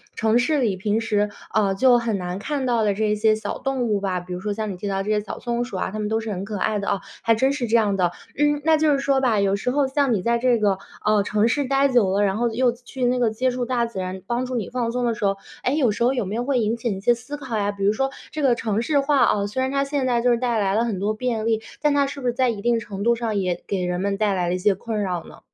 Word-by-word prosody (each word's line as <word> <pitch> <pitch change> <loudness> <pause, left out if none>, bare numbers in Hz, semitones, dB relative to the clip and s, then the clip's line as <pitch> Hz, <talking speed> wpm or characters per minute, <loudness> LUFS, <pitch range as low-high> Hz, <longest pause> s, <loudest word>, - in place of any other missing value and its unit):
城 225 +1 +2
市 295 +5 +1
里 225 -7 +1
平 210 +3 0
时， 210 -2 0 0.2
啊， 200 -2 +2
就 245 +3 +5
很 230 -3 -1
难 180 0 -4
看 280 +4 -2
到 235 -3 +2
的 205 -2 +1
这 210 0 +1
些 215 +1 +3
小 215 -1 -5
动 270 -2 -1
物 215 -4 +1
吧， 190 -2 -1
比 180 +1 -8
如 180 - -4
说 210 +3 -3
像 215 0 -3
你 - - -5
提 190 +3 -6
到 195 -1 -1
的 195 - -1
这 205 - -5
些 210 - +2
小 210 - -7
松 240 0 -1
鼠 240 -6 -6
啊， 185 - -2
它 215 - -5
们 210 -1 -2
都 220 +1 +1
是 225 -1 -5
很 190 -1 -4
可 210 +1 -5
爱 210 +2 0
的 200 - -3
哦， 200 - 0 0.2
还 230 - +3
真 265 +5 +2
是 260 -4 -2
这 225 - +2
样 210 -3 +2
的。 180 -2 +1 0.2
嗯， 295 +1 +2
那 320 0 +5
就 310 0 +3
是 280 - +3
说 275 -1 +1
吧， 235 -5 +2
有 200 0 +2
时 210 +5 -2
候 280 +2 +2
像 270 -1 +1
你 185 - -2
在 235 0 +1
这 245 -1 +3
个， 200 -3 +1 0.3
哦， 215 -1 +4
城 210 +2 +1
市 285 +4 +1
待 275 +1 +3
久 240 -7 +3
了， 200 +2 +2
然 195 0 +1
后 240 +1 +1
又 245 +2 +2
去 245 +2 -5
那 250 +1 +2
个 240 -2 +3
接 255 +4 0
触 250 0 -2
大 240 -1 0
自 230 -4 -6
然 185 0 -4
帮 240 +4 -1
助 255 - -4
你 220 -6 -2
放 240 -2 -2
松 250 +1 -1
的 235 - +1
时 225 0 -7
候， 195 0 +2 0.3
诶， 260 - +1
有 255 -8 +3
时 210 +3 -1
候 250 +2 +3
有 245 -5 -1
没 195 +3 -4
有 240 - -1
会 265 -1 +1
引 220 0 +1
起 235 0 -3
一 - - -6
些 240 +5 +3
思 250 +5 -7
考 260 -6 -4
呀？ 205 -1 0
比 200 -1 -6
如 205 - +4
说 270 +5 0 0.2
这 310 - -4
个 260 -4 +4
城 220 -2 -1
市 285 +4 +1
化 280 0 +2
啊， 200 -5 +3
虽 235 +6 -3
然 260 0 0
它 275 0 +1
现 280 -1 -1
在 240 -2 +1
就 245 - +2
是 240 - +3
带 240 -2 0
来 195 -2 +1
了 225 - +2
很 220 -6 -2
多 205 +2 0
便 225 -1 -2
利， 225 -1 +1 0.2
但 295 -1 +3
它 285 -1 +3
是 280 +1 -7
不 250 - -3
是 240 - +1
在 255 0 +2
一 215 -4 -3
定 235 +1 +2
程 200 -2 -6
度 235 +1 +3
上， 225 -3 -2
也 180 -3 -1
给 190 -2 -1
人 180 0 -2
们 200 0 -1
带 210 -1 +1
来 180 -2 0
了 180 - 0
一 - - -1
些 195 +2 +2
困 215 +2 -3
扰 180 -4 -2
呢？ - - -14
225 Hz, 345 characters per minute, -23 LUFS, 205-250 Hz, 0.3 s, 就